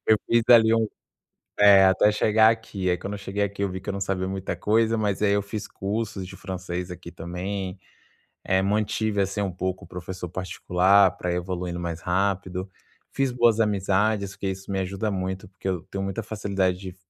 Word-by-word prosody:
Eu 110 - +6
fiz 115 0 +3
ali 115 -2 +7
um 115 -1 +2 0.7
eh, 100 -2 +8
até 95 +2 +5
chegar 110 +1 +4
aqui, 110 -5 -2
aí 90 - +1
quando 100 - -6
eu - - -6
cheguei 100 +1 -3
aqui, 100 0 -4
eu 100 - +1
vi 95 +1 -5
que 95 - -13
eu - - 0
não 100 - -4
sabia 95 -1 -1
muita 95 0 -3
coisa, 115 +1 +2
mas 105 -2 -1
aí 100 -1 +3
eu 100 - +1
fiz 100 +1 -6
cursos 100 -1 -3
de 95 - -10
francês 90 -1 -5
aqui, 85 -1 -9
também. 90 +3 -5 0.7
Eh, 95 0 +2
mantive, 105 +1 0
assim, 100 +1 -1
um 100 - -1
pouco 95 +1 -3
o - - -15
professor 90 0 -6
particular 95 +2 +3
pra 90 -3 -2
evoluindo 90 0 -3
mais 85 -1 -4
rápido. 95 0 -1 0.4
Fiz 135 -1 +1
boas 120 -2 +3
amizades, 100 0 +1
porque 100 - -4
isso 95 +1 -6
me 95 - -1
ajuda 100 +3 -2
muito, 95 +1 -3
porque 95 0 -6
eu 90 -3 -2
tenho 95 - -3
muita 95 +3 -3
facilidade 100 -4 -1
de 95 -1 -8
95 Hz, 195 wpm, -25 LUFS, 95-105 Hz, 0.7 s, eh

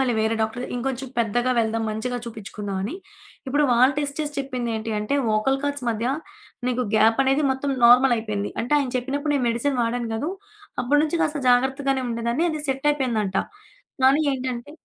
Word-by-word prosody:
మళ్ళీ 255 -2 +2
వేరే 220 +1 +1
డాక్టర్ 225 +3 -3
ఇంకొంచెం 265 +1 -3
పెద్దగా 240 +2 +1
వెళ్దాం, 225 0 -1
మంచిగా 245 +3 -3
చూపిచ్చుకుందామని. 205 - -5 0.5
ఇప్పుడు 290 +3 +2
వాళ్ళు 255 +4 +5
టెస్ట్ 285 0 -3
చేసి 295 -1 -3
చెప్పిందేంటి 235 -5 -3
అంటే, 210 +7 0 0.2
ఓకల్ 270 +5 +1
కార్ట్స్ 285 -3 -2
మధ్య 230 +1 -2 0.6
నీకు 250 0 0
గ్యాప్ 225 +3 +4
అనేది 270 +3 +2
మొత్తం 265 +1 -1
నార్మలయిపోయింది. 235 -4 +4
అంటే, 245 - -3
ఆయన 275 -3 -1
చెప్పినప్పుడు 285 +4 -1
నేను 265 -4 +1
మెడిసిన్ 250 +3 0
వాడాను 235 0 -2
గదూ, 290 +10 -2 0.5
అప్పడనుంచి 295 +5 +2
కాస్త 305 -2 -1
జాగ్రత్తగానే 265 +2 +2
ఉండేదాన్ని, 235 +7 0
అది 310 -1 -3
సెట్టయిపోయిందంట. 260 -8 0 0.7
గానీ 275 +3 +5
ఏంటంటే 255 -1 -4
250 Hz, 150 wpm, -23 LUFS, 230-275 Hz, 0.7 s, వాళ్ళు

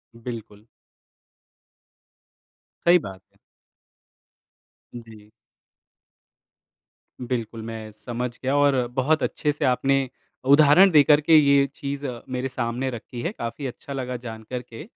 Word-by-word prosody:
बिल्कुल। 115 -3 -9 2.2
सही 175 +1 +7
बात 95 - -9
है। - - -31 1.6
जी। 110 -3 -12 1.9
बिल्कुल, 120 -2 -4
मैं 110 -1 -7
समझ 120 +3 -5
गया 135 +2 0
और 135 -4 +3
बहुत 145 +4 +1
अच्छे 150 - -1
से 150 0 -2
आपने 135 +1 +1 0.4
उदाहरण 155 +6 +7
देकर 150 -1 +6
के 160 +2 +4
ये 140 -1 +5
चीज़ 140 0 -5 0.2
मेरे 130 +1 -2
सामने 125 +1 -2
रखी 120 0 -7
है। 170 - -2
काफ़ी 120 +4 -5
अच्छा 140 +3 -8
लगा 125 -2 -4
जान 110 -1 -7
कर 125 -1 -3
के, 120 0 -12
125 Hz, 115 wpm, -24 LUFS, 115-140 Hz, 2.2 s, सही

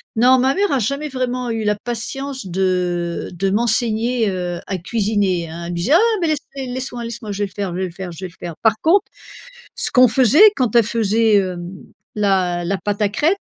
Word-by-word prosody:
Non, 250 +3 +5
ma 265 +2 +2
mère 405 +1 +1
a 275 - +2
jamais 280 +7 -2
vraiment 250 -2 -2
eu 225 -1 -2
la 210 0 +1
patience 260 +1 -4
de 180 -2 -1
de 195 +3 -1
m'enseigner, 230 +1 +1
heu, 180 -2 -3
à 190 - -3
cuisiner, 200 -3 0
hein. 170 +1 -7
Elle 170 - -5
me - - -4
disait: 170 +10 -2
«Ah 450 +4 +3
mais 335 - +1
laissez 275 -4 -4
laisse-moi 250 -2 -5
laisse-moi, 230 -2 -6
je 200 +1 -2
vais - - +1
le 195 - -10
faire 200 -3 -3
je 175 - -5
vais 190 - -1
le 180 - -6
faire 180 +1 -7
je 170 +3 -8
vais - - -6
le - - -22
faire». 170 -2 -6
Par 220 -1 +3
contre 380 +5 +3 0.7
ce - - 0
qu'on 255 -1 +6
faisait 260 - +5
quand 245 -3 0
elle 235 - +6
faisait, 220 0 +2
hem, 180 -3 -1 0.4
la 185 -4 +1
la 195 +3 -1
pâte 205 +1 -3
à 210 - +3
crêpe. 315 - +1
215 Hz, 220 wpm, -19 LUFS, 185-250 Hz, 0.7 s, qu'on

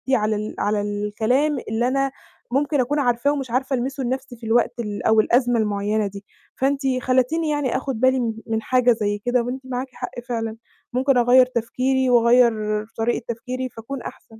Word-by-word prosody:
على 215 -2 +1
ال 215 +1 -4
على 205 0 +1
الكلام 220 +8 0
اللي 230 +2 0
أنا 275 +1 0 0.4
ممكن 285 +2 +1
أكون 275 +4 +1
عارفاه 245 +1 +2
ومش 270 -5 -3
عارفة 265 +2 0
ألمسه 265 +2 -3
لنَفْسي 260 0 -3
في 230 - -11
الوقت 235 +2 +1
ال 210 -3 -4
أو 220 0 +4
الأزمة 245 +1 +3
المعيّنة 210 0 0
دي، 200 0 -9 0.3
فأنتِ 275 +1 +1 0.2
خلّيتيني 260 +6 +1
يعني 290 -4 0
آخُد 265 -3 -4
بالي 260 +1 +3
م 230 -2 -1
من 225 0 -1
حاجة 250 0 +3
زي 205 -3 0
كده 245 0 +2
وأنتِ 255 +2 -4
معاكِ 255 +1 -3
حق 245 - -7
فعلًا 225 -2 -3 0.4
ممكن 265 +1 +2
أغيّر 245 +1 +6
تفكيري 255 +2 0
وأغيّر 240 0 +5 0.4
طريقة 230 +1 -1
تفكيري 255 +2 -4
فأكون 240 +4 -7
أحسن، 220 -1 -11
245 Hz, 175 wpm, -22 LUFS, 225-260 Hz, 0.4 s, أغيّر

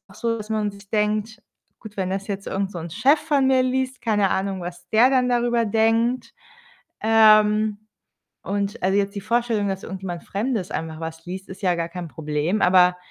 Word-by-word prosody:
auch 195 - -17
so, 230 -1 -2
dass 215 0 -8
man 215 -1 0
sich 200 0 -15
denkt: 215 +2 -1 0.4
„Gut, 220 -3 -11
wenn 185 - -1
das 195 +1 -3
jetzt 195 -1 -4
irgend 195 0 -2
so 175 - -6
'n 165 - -6
Chef 260 - +3
von 285 -4 +1
mir 260 -1 +4
liest, 260 0 -1
keine 205 -4 +1
Ahnung, 190 0 -1
was 175 0 -8
der 235 +4 +5
dann 255 -2 +2
darüber 240 -1 +1
denkt?“ 225 +3 +1 0.7
Ähm, 215 -1 +5 0.6
und 200 +2 -3
also, 190 +2 +2
jetzt 200 0 0
die 200 - -4
Vorstellung, 225 -1 0
dass 190 0 -3
irgendjemand 185 -3 -6
Fremdes 210 -2 -3
einfach 160 -1 -4
was 160 0 -7
liest, 190 +1 -6
ist 190 - -10
ja 180 -3 +2
gar 170 0 -2
kein 175 0 -6
Problem, 155 +5 -2
aber 180 0 +5
205 Hz, 190 wpm, -23 LUFS, 185-230 Hz, 0.7 s, der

